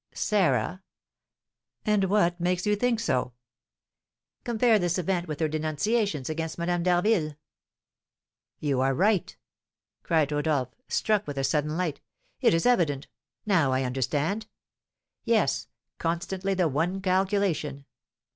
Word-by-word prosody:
"Sarah! 190 -3 +1 1.0
And 210 -3 +3
what 185 -3 +2
makes 180 +1 0
you 210 0 +3
think 235 +1 +1
so?" 125 - -1 1.1
"Compare 235 -2 +3
this 175 -1 0
event 180 0 -1
with 150 -2 -5
her 160 - +2
denunciations 155 - -1
against 160 0 -3
Madame 175 0 0
d'Harville." 175 -3 +2 1.2
"You 140 -4 0
are 135 0 +2
right!" 195 +4 +1 0.6
cried 155 -3 +1
Rodolph, 145 -4 0
struck 215 -1 +1
with 145 -1 -5
a 135 - 0
sudden 150 +3 0
light, 180 -5 -2 0.4
"it - - +4
is 165 - 0
evident 160 - +2 0.4
now 170 -10 +3
I 130 +1 +1
understand. 145 - -1 0.8
Yes, 140 - +1 0.3
constantly 185 +3 -1
the 180 -2 +2
one 165 +7 -1
calculation. 185 -7 0
170 Hz, 120 wpm, -27 LUFS, 150-195 Hz, 1.2 s, it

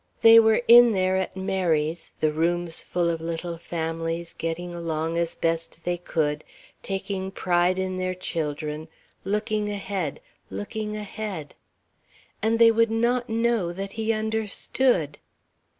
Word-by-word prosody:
They 225 0 +10
were 220 +1 +4
in 240 -1 +9
there 185 -1 +1
at 190 0 -2
Mary's, 175 -4 0
the 155 - +3
rooms 170 +1 0
full 175 -1 -1
of 165 -1 -1
little 165 +1 -4
families, 165 0 -3
getting 175 +2 -4
along 165 -1 -2
as 170 -1 -1
best 165 0 -2
they 175 0 -1
could, 150 -3 -1 0.4
taking 195 -1 -3
pride 180 -1 +1
in 185 0 -2
their 185 0 -1
children, 155 -3 -4 0.4
looking 210 +1 -1
ahead, 195 -6 -3 0.3
looking 210 - -4
ahead 210 -6 -6 0.9
and 225 +1 +2
they 230 0 +7
would 230 0 +3
not 235 +2 +1
know 225 -5 +1
that 195 +2 -5
he 220 +1 -1
understood. 220 - 0
185 Hz, 135 wpm, -25 LUFS, 165-215 Hz, 0.9 s, They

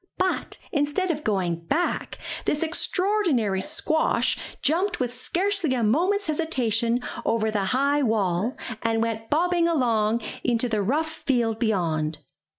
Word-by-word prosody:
But, 370 0 0
instead 295 +5 +1
of 300 -1 -4
going 180 -5 -1
back, 345 +4 -1 0.3
this 300 - +1
extraordinary 330 - +1
squash 315 +10 +1 0.3
jumped 355 +7 +1
with 245 -2 -1
scarcely 350 +3 0
a 240 - 0
moment's 360 - +2
hesitation 245 -7 0 0.2
over 220 -1 +1
the 205 -2 0
high 280 +6 +2
wall, 215 -2 0 0.2
and 225 0 +1
went 225 -1 -3
bobbing 345 +2 +2
along 230 -7 +1 0.2
into 240 0 +2
the 215 -3 0
rough 300 +10 0 0.2
field 235 -4 +1
beyond. 165 -8 0
250 Hz, 130 wpm, -25 LUFS, 220-320 Hz, 0.3 s, moment's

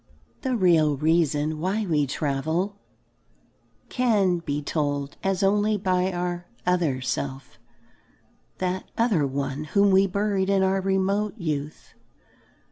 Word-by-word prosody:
The 260 -2 -1
real 165 -8 +3
reason 155 0 +1
why 195 +6 -1
we 150 -5 +1
travel 160 +8 -1 1.1
can 205 -8 +2
be 145 -3 -3
told 145 -1 -2
us 195 0 0
only 210 +2 +2
by 185 -1 +1
our 175 0 -3 0.2
"other 170 -8 +1
self," 135 +1 -4 1.0
that 185 0 -3
"other 210 - +2
one" 135 +2 -3
whom 200 +5 +3
we 190 +1 +5
buried 200 0 0
in 195 -1 +3
our 190 0 +1
remote 195 +3 0
youth. 150 -5 -4
180 Hz, 120 wpm, -25 LUFS, 150-195 Hz, 1.1 s, we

